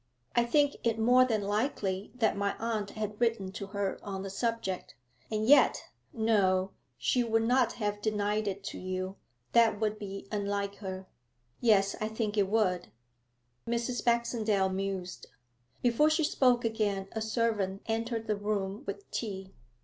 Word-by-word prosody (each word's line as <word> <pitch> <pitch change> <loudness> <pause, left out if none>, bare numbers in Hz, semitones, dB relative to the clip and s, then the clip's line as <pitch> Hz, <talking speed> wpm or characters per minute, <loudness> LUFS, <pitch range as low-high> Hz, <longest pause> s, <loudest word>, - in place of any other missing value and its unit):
'I 240 - +4
think 285 +4 +2
it 230 -1 +1
more 250 +3 +5
than 220 -4 0
likely 205 -2 -1
that 225 -3 +2
my 200 0 -1
aunt 220 -3 -2
had 210 0 -5
written 225 -5 +1
to 200 0 -6
her 200 -1 -2
on 195 -2 -5
the 195 - -5
subject. 230 -3 -2 0.4
And 215 0 0
yet 290 +5 +5 0.2
no; 195 -5 +2 0.3
she 250 - +2
would 225 -1 +1
not 245 0 +3
have 205 -2 -2
denied 210 0 0
it 200 0 -3
to 200 - -6
you. 185 +1 -4 0.3
That 230 -3 +4
would 215 -1 -1
be 195 -1 -7
unlike 200 -1 -2
her.' 190 -2 -6 0.5
'Yes, 200 -4 +4
I 215 - 0
think 220 -1 -2
it 200 -2 +3
would.' 190 -5 +1 0.8
Mrs. 235 +1 -1
Baxendale 225 -5 +2
mused. 190 -1 -4 0.6
Before 245 +5 +4
she 315 +1 +2
spoke 250 -4 +3
again 205 -4 0
a 220 - -3
servant 215 -4 0
entered 225 0 -2
the 215 - 0
room 205 +1 -2
with 405 - -5
tea. 195 -4 -4
215 Hz, 155 wpm, -30 LUFS, 195-230 Hz, 0.8 s, more